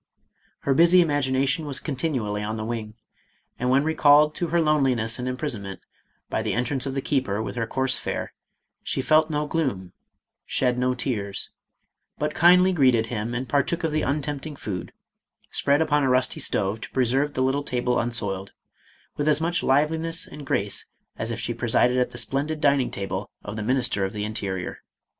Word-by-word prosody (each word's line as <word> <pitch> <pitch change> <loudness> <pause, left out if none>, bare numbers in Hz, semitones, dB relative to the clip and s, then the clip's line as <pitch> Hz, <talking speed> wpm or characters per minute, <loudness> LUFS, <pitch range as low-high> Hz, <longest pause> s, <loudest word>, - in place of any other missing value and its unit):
Her 140 - +1
busy 170 +5 +6
imagination 145 -1 +1
was 140 -1 -1
continually 130 -8 -2
on 110 +1 -3
the 110 - -4
wing, 110 -2 -5 0.6
and 125 - 0
when 135 +2 +4
recalled 150 -1 +5
to 175 - -2
her 170 +2 +1
loneliness 135 -8 +2
and 125 - -3
imprisonment, 120 - -4 0.5
by - - -1
the - - -1
entrance 125 +3 -1
of 135 - -4
the 135 - -2
keeper 130 -8 0
with 110 - -4
her 115 -2 -2
coarse 130 +2 0
fare, - - -4 0.5
she - - -2
felt 155 +4 +3
no 150 -1 -1
gloom, 130 - -2 0.5
shed 125 -1 +1
no 125 0 +1
tears, 105 -6 -3 0.7
but 150 0 -2
kindly 180 +2 +5
greeted 130 -8 +3
him 115 +2 -3
and 130 +2 -3
partook 145 +6 0
of 160 - 0
the 155 0 0
untempting 145 +1 -3
food, 95 -9 -5 0.6
spread 145 +3 +2
upon 150 -2 +2
a 135 - +2
rusty 125 0 +1
stove 105 +2 0
to - - -7
preserve 135 +3 +1
the 130 - +1
little 135 +2 +1
table 125 -3 0
unsoiled, 100 -5 -1 0.6
with 145 - -1
as 150 -1 +4
much 170 +2 0
liveliness 160 +5 +1
and 145 -2 -10
grace 100 -4 0 0.3
as 110 - -3
if 115 - -3
she 115 +2 -2
presided 120 +1 +2
at 125 - +1
the - - -7
splendid 150 +3 -1
dining 140 -3 +3
table 95 0 -4
of 105 - -6
the 110 - -4
Minister 125 -3 +1
of 95 +2 -2
the 105 -1 -3
Interior. 95 -4 -3
130 Hz, 180 wpm, -24 LUFS, 115-150 Hz, 0.7 s, busy